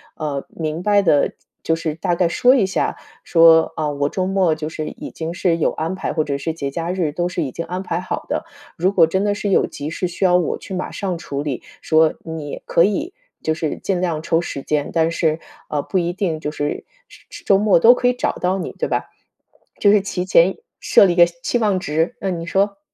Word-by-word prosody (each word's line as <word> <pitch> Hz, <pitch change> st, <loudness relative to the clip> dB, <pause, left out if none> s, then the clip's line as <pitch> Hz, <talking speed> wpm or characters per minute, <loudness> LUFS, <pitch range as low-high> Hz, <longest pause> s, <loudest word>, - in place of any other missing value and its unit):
呃， 145 Hz, -3 st, -4 dB
明 160 Hz, 0 st, -4 dB
白 205 Hz, 0 st, +4 dB
地， 150 Hz, -7 st, +2 dB, 0.3 s
就 165 Hz, -, +1 dB
是 165 Hz, -1 st, -3 dB
大 175 Hz, +2 st, -1 dB
概 175 Hz, 0 st, +2 dB
说 245 Hz, +9 st, +4 dB
一 230 Hz, -7 st, +3 dB
下， 190 Hz, -, -1 dB, 0.3 s
说： 165 Hz, -1 st, +5 dB
“啊， 155 Hz, -1 st, 0 dB
我 145 Hz, 0 st, -1 dB
周 185 Hz, +3 st, -2 dB
末 190 Hz, -4 st, +2 dB
就 155 Hz, 0 st, -5 dB
是 155 Hz, -1 st, -5 dB
已 -, -, -9 dB
经 165 Hz, +1 st, -5 dB
是 175 Hz, -2 st, +1 dB
有 165 Hz, -, +1 dB
安 160 Hz, +3 st, -3 dB
排， -, -, -3 dB
或 155 Hz, -, +1 dB
者 140 Hz, -2 st, -2 dB
是 160 Hz, +4 st, -3 dB
节 140 Hz, -4 st, -4 dB
假 170 Hz, +4 st, -3 dB
日， 180 Hz, -5 st, -1 dB
都 175 Hz, +4 st, -1 dB
是 175 Hz, -2 st, -2 dB
已 135 Hz, -, -4 dB
经 165 Hz, -, -5 dB
安 180 Hz, +3 st, -4 dB
排 175 Hz, -2 st, -2 dB
好 185 Hz, -, -4 dB
的， -, -, -2 dB, 0.3 s
如 185 Hz, +3 st, +2 dB
果 170 Hz, -4 st, +6 dB
真 190 Hz, +4 st, 0 dB
的 205 Hz, 0 st, +1 dB
是 205 Hz, 0 st, -3 dB
有 195 Hz, -, +3 dB
急 145 Hz, -, -6 dB
事， 180 Hz, +3 st, -2 dB
需 175 Hz, +2 st, -2 dB
要 180 Hz, -1 st, +4 dB
我 175 Hz, -, -1 dB
去 -, -, -9 dB
马 185 Hz, -, -3 dB
上 185 Hz, -3 st, -3 dB
处 140 Hz, -4 st, -5 dB
理” 140 Hz, -4 st, -3 dB, 0.2 s
说 160 Hz, 0 st, +3 dB
你 160 Hz, -3 st, -6 dB
可 170 Hz, -, +3 dB
以 295 Hz, -, -1 dB, 0.3 s
就 160 Hz, -, +1 dB
是 155 Hz, -1 st, -3 dB
尽 185 Hz, -3 st, -2 dB
量 165 Hz, -4 st, -1 dB
抽 165 Hz, 0 st, +1 dB
时 140 Hz, -5 st, -5 dB
间， 150 Hz, -1 st, -1 dB
但 165 Hz, 0 st, +2 dB
是， 160 Hz, -1 st, 0 dB, 0.3 s
啊， 150 Hz, -, -1 dB
不 190 Hz, -, -2 dB
一 170 Hz, 0 st, -1 dB
定 175 Hz, -4 st, -2 dB
就 150 Hz, -, -3 dB
是 145 Hz, -1 st, -3 dB, 0.2 s
是 -, -, -18 dB
是 340 Hz, 0 st, -11 dB
周 195 Hz, -, +4 dB
末 205 Hz, -2 st, +4 dB
都 230 Hz, +8 st, +8 dB
可 250 Hz, 0 st, 0 dB
以 250 Hz, -, +3 dB
找 250 Hz, -, -1 dB
到 185 Hz, +1 st, -1 dB
你， -, -, -4 dB
对 -, -, 0 dB
吧？ -, -, -1 dB, 0.7 s
就 205 Hz, -, +5 dB
是 210 Hz, -1 st, +5 dB
提 185 Hz, -2 st, -3 dB
前 185 Hz, 0 st, +4 dB, 0.2 s
设 -, -, +5 dB
立 180 Hz, -, +2 dB
一 -, -, -6 dB
个 175 Hz, -1 st, +7 dB
期 170 Hz, +7 st, -3 dB
望 205 Hz, -4 st, +1 dB
值， 160 Hz, -1 st, -1 dB
嗯， 185 Hz, -3 st, -2 dB
你 165 Hz, -, -6 dB
说。 200 Hz, +3 st, 0 dB
170 Hz, 260 characters per minute, -20 LUFS, 160-190 Hz, 0.7 s, 都